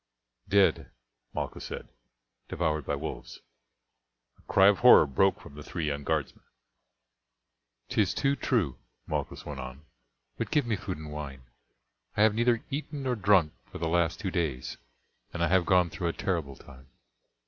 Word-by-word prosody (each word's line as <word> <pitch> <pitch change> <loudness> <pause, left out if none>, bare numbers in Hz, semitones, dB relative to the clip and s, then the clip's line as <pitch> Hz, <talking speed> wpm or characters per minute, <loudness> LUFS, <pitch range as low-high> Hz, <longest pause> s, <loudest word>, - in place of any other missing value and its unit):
"Dead," 100 0 +3 0.4
Malchus - - -4
said - - -7 0.6
"devoured 75 -3 -1
by - - 0
wolves." - - -7 1.0
A - - -11
cry 95 0 +6
of 100 -1 +4
horror 125 -8 +8
broke 95 +8 +2
from - - -13
the 75 - -9
three 80 +2 -4
young 70 -1 -2
guardsmen. 80 -1 -2 1.4
"'Tis - - +1
too 140 0 +2
true," 110 - 0 0.3
Malchus - - -4
went 75 -3 -6
on; 65 +3 -8 0.5
"but - - -2
give 145 -4 +2
me 115 -2 0
food 90 - -5
and 75 -1 -8
wine. 70 -3 -7 0.7
I 105 - +5
have 110 -1 +5
neither 120 +1 +2
eaten 145 0 -4
nor 130 -2 0
drunk 95 -7 +3 0.2
for - - -7
the 85 - -2
last 85 +1 +1
two 95 -4 -3
days, 80 -9 -2 0.6
and 85 - 0
I 85 - +2
have 95 -1 +3
gone 90 -2 +4
through 85 - -3
a 85 - -1
terrible 80 -8 -2
time. 65 -1 -15
85 Hz, 160 wpm, -29 LUFS, 75-105 Hz, 1.4 s, horror